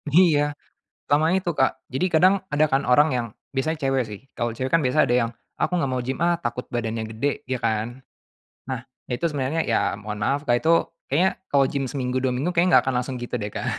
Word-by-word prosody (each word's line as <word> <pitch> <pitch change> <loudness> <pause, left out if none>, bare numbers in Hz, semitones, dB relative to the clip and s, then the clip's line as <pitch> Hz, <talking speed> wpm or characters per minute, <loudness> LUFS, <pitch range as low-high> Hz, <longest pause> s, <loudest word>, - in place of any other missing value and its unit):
Iya, 145 -5 +4 0.5
selama 155 +5 +3
itu, 185 -2 0
Kak. 135 -2 0
Jadi 130 +8 0
kadang 185 +4 +6 0.2
ada 155 +1 +4
kan 135 +1 +2
orang 150 +5 +5
yang 120 - 0 0.3
biasanya 155 +5 0
cewek 135 -1 +1
sih. 105 -2 -8 0.2
Kalau 120 -1 -1
cewek 130 +2 -3
kan 165 - +5
biasa 130 +4 +4
ada 120 - +2
yang, 115 - -4 0.3
"Ah - - +2
aku 180 - -1
gak 135 - 0
mau 130 -1 -1
gym 130 +2 -3
ah 175 0 +2
takut 120 -4 -3
badannya 115 -2 -2
gede," 130 +6 0 0.2
ya 130 - 0
kan? 115 +4 -2 0.7
Nah, 130 -3 -3 0.3
ya - - -3
itu - - -2
sebenarnya 145 +3 -1
ya - - +1
mohon 105 0 -6
maaf, 140 +5 0
Kak, 120 - +4
itu 160 - +1 0.4
kayaknya 175 +8 +3 0.2
kalau 140 -1 +4
gym 140 -1 -1
seminggu 130 -2 -2
2 130 - +2
minggu 145 +8 -1
kayaknya 175 +1 +5
gak - - -4
akan 130 - -1
langsung 125 +1 -4
gitu 120 - -4
deh, 105 -1 -3
Kak. - - -4
135 Hz, 225 wpm, -24 LUFS, 125-155 Hz, 0.7 s, kadang